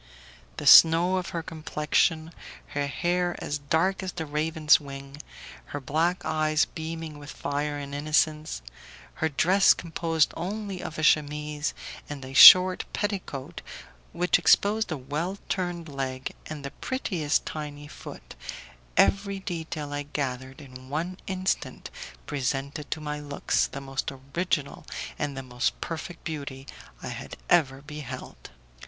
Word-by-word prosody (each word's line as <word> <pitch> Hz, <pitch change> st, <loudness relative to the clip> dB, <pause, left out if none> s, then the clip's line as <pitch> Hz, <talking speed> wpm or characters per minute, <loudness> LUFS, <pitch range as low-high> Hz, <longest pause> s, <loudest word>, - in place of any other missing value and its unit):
The -, -, -5 dB
snow 170 Hz, +3 st, +8 dB
of 180 Hz, -, -3 dB
her 165 Hz, -1 st, -4 dB
complexion, 160 Hz, +1 st, 0 dB, 0.4 s
her 145 Hz, 0 st, -1 dB
hair 175 Hz, +4 st, 0 dB
as 145 Hz, 0 st, -3 dB
dark 165 Hz, +7 st, +1 dB
as 185 Hz, -1 st, -4 dB
the 160 Hz, -2 st, -4 dB
raven's 155 Hz, +1 st, +3 dB
wing, 140 Hz, -1 st, -9 dB, 0.5 s
her 145 Hz, -, -5 dB
black 160 Hz, +7 st, 0 dB
eyes 155 Hz, -1 st, +2 dB
beaming 160 Hz, -1 st, -6 dB
with 145 Hz, 0 st, -10 dB
fire 145 Hz, +1 st, -3 dB
and 140 Hz, -1 st, -7 dB
innocence, 150 Hz, -, 0 dB, 0.6 s
her 160 Hz, -, +2 dB
dress 185 Hz, +7 st, +5 dB
composed 165 Hz, -1 st, 0 dB
only 200 Hz, 0 st, -4 dB
of 155 Hz, -, -6 dB
a 155 Hz, -, -3 dB
chemise 150 Hz, 0 st, +1 dB, 0.3 s
and 140 Hz, -3 st, -6 dB
a 130 Hz, -, -9 dB
short 185 Hz, +7 st, +10 dB
petticoat 175 Hz, -7 st, -4 dB, 0.5 s
which 180 Hz, +1 st, +2 dB
exposed 205 Hz, +4 st, +3 dB
a 155 Hz, -, -1 dB
well 150 Hz, +9 st, -3 dB
turned 175 Hz, -3 st, -2 dB
leg 130 Hz, -2 st, -4 dB
and 150 Hz, -2 st, -7 dB
the 140 Hz, -, -5 dB
prettiest 170 Hz, -, -1 dB
tiny 145 Hz, -1 st, -6 dB
foot, -, -, -10 dB, 0.6 s
every 200 Hz, 0 st, +3 dB
detail 160 Hz, -5 st, -5 dB
I 145 Hz, -, -2 dB
gathered 135 Hz, -1 st, -4 dB
in 130 Hz, -2 st, -12 dB
one 170 Hz, +6 st, -3 dB
instant 190 Hz, 0 st, -2 dB, 0.3 s
presented 140 Hz, +1 st, -3 dB
to 155 Hz, -, -2 dB
my 150 Hz, 0 st, -4 dB
looks 145 Hz, -1 st, 0 dB
the 140 Hz, -, -7 dB
most 135 Hz, 0 st, -3 dB, 0.2 s
original 170 Hz, -5 st, -1 dB, 0.4 s
and 145 Hz, -2 st, -2 dB
the 135 Hz, -, -4 dB
most 125 Hz, 0 st, -2 dB
perfect 170 Hz, +1 st, -6 dB
beauty 140 Hz, -4 st, -6 dB, 0.4 s
I -, -, -4 dB
had -, -, -7 dB
ever 140 Hz, -6 st, +3 dB
beheld. 145 Hz, -4 st, -8 dB
155 Hz, 135 wpm, -27 LUFS, 145-170 Hz, 0.6 s, short